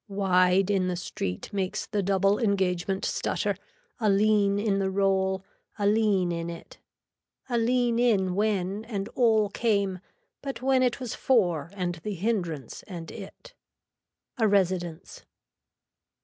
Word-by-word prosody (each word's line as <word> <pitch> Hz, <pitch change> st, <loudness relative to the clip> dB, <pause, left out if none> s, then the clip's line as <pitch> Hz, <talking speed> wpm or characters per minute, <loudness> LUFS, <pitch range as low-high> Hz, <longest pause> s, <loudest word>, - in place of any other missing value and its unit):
Wide 190 Hz, -1 st, +3 dB
in 190 Hz, -2 st, +1 dB
the 180 Hz, -, -1 dB
street 95 Hz, -, -5 dB
makes 190 Hz, -2 st, -2 dB
the 210 Hz, -2 st, -1 dB
double 195 Hz, +1 st, +2 dB
engagement 190 Hz, -3 st, 0 dB
stutter, -, -, -1 dB, 0.4 s
a 215 Hz, -3 st, +2 dB
lean 200 Hz, 0 st, +3 dB
in 205 Hz, -1 st, +1 dB
the 195 Hz, -1 st, 0 dB
roll, 190 Hz, -1 st, +1 dB, 0.3 s
a 205 Hz, -, -1 dB
lean 205 Hz, -4 st, +2 dB
in 170 Hz, 0 st, -3 dB
it. 170 Hz, -1 st, -10 dB, 0.7 s
A 245 Hz, -, -1 dB
lean 240 Hz, 0 st, +2 dB
in 200 Hz, -7 st, +2 dB
when 200 Hz, 0 st, 0 dB
and 205 Hz, -2 st, -4 dB
all 220 Hz, -4 st, +3 dB
came 200 Hz, -4 st, 0 dB, 0.4 s
but 275 Hz, -3 st, -5 dB
when 260 Hz, +1 st, +2 dB
it 250 Hz, 0 st, +1 dB
was 250 Hz, -3 st, -4 dB
for 175 Hz, -, +1 dB
and 175 Hz, -3 st, -3 dB
the 210 Hz, +3 st, -4 dB
hindrance 175 Hz, -, -2 dB
and 170 Hz, -5 st, -7 dB
it. -, -, -11 dB, 0.9 s
A 220 Hz, -, +4 dB
residence. 185 Hz, -4 st, -1 dB
195 Hz, 135 wpm, -27 LUFS, 185-215 Hz, 0.9 s, A